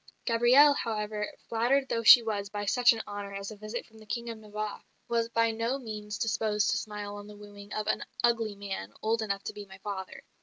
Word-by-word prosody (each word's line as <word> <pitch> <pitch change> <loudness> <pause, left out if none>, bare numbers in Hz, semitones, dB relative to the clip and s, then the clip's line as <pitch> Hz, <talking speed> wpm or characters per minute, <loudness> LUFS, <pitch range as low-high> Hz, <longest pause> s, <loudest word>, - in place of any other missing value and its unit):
Gabrielle, 245 +5 +6
however, 210 -4 -2 0.2
flattered 250 +4 +2
though 230 - -1
she 230 +1 +9
was 205 -3 -2
by 205 0 -4
such 245 +4 +5
an 225 -2 -2
honour 205 -1 -6
as 200 +2 -5
a - - -8
visit 215 +3 -6
from 220 -1 -18
the 215 - -14
King 235 +3 -3
of 225 - -9
Navarre, 215 0 -5 0.3
was 230 -1 0
by 230 -1 +2
no 230 +4 -1
means 210 -4 -6
disposed 210 -2 +1
to - - +1
smile 205 -1 -5
on 205 0 -9
the 210 0 -11
wooing 205 0 -12
of 215 - -2
"an - - 0 0.2
ugly 230 -3 +2
man, 195 - -6
old 225 +1 +1
enough 200 -2 -2
to - - -5
be 205 -1 -9
my 190 0 -12
father." 195 -1 -6
215 Hz, 220 wpm, -29 LUFS, 205-230 Hz, 0.3 s, she